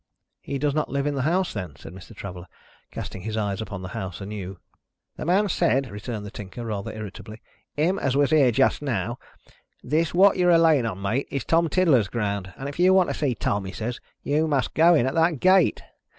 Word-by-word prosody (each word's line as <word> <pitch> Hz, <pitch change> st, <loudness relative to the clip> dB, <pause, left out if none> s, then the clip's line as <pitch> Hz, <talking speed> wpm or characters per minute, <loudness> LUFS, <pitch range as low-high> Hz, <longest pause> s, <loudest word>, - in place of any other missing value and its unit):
"He 140 Hz, -, -4 dB
does 145 Hz, +1 st, 0 dB
not 155 Hz, +1 st, -1 dB
live 140 Hz, 0 st, -1 dB
in 145 Hz, -, 0 dB
the 135 Hz, -, -2 dB
house, 175 Hz, +7 st, 0 dB
then?" 85 Hz, -6 st, -6 dB
said 80 Hz, +1 st, -11 dB
Mr. 95 Hz, +4 st, -12 dB
Traveller, 90 Hz, -3 st, -8 dB, 0.4 s
casting 95 Hz, -, -7 dB
his 110 Hz, +3 st, -4 dB
eyes 105 Hz, -1 st, -2 dB
upon 100 Hz, -4 st, -6 dB
the 90 Hz, -, -6 dB
house 95 Hz, -1 st, -6 dB
anew. 100 Hz, -2 st, -6 dB, 0.6 s
"The -, -, -6 dB
man 190 Hz, +5 st, +3 dB
said," 135 Hz, -, +1 dB
returned 105 Hz, +1 st, -6 dB
the 100 Hz, -, -8 dB
Tinker, 105 Hz, +4 st, -8 dB
rather 105 Hz, -3 st, -4 dB
irritably, 110 Hz, 0 st, -9 dB, 0.4 s
"him 175 Hz, +6 st, +1 dB
as 135 Hz, 0 st, 0 dB
was 145 Hz, 0 st, +2 dB
here 145 Hz, -5 st, +5 dB
just 135 Hz, +5 st, +2 dB
now, 120 Hz, -4 st, -2 dB, 0.6 s
'this 160 Hz, +2 st, 0 dB
what 195 Hz, +2 st, +5 dB
you're 180 Hz, -1 st, +3 dB
a 170 Hz, -, +6 dB
laying 155 Hz, -7 st, +4 dB
on, 95 Hz, -3 st, -5 dB
mate, 120 Hz, +8 st, -1 dB
is 140 Hz, -4 st, -3 dB
Tom 165 Hz, 0 st, +2 dB
Tiddler's 150 Hz, -, +3 dB
ground. 100 Hz, -3 st, -3 dB
And 135 Hz, -, -5 dB
if 140 Hz, +3 st, -7 dB
you 185 Hz, +1 st, +5 dB
want 185 Hz, -2 st, +4 dB
to -, -, -2 dB
see 140 Hz, -5 st, -1 dB
Tom,' 100 Hz, -1 st, -1 dB
he 95 Hz, -, -5 dB
says, 120 Hz, +2 st, -4 dB, 0.2 s
'you 155 Hz, +3 st, +1 dB
must 140 Hz, -4 st, 0 dB
go 170 Hz, +2 st, +5 dB
in 125 Hz, -, +3 dB
at 130 Hz, -, -1 dB
that 165 Hz, -3 st, +2 dB
gate.' 185 Hz, +1 st, +4 dB
130 Hz, 220 wpm, -24 LUFS, 100-160 Hz, 0.6 s, a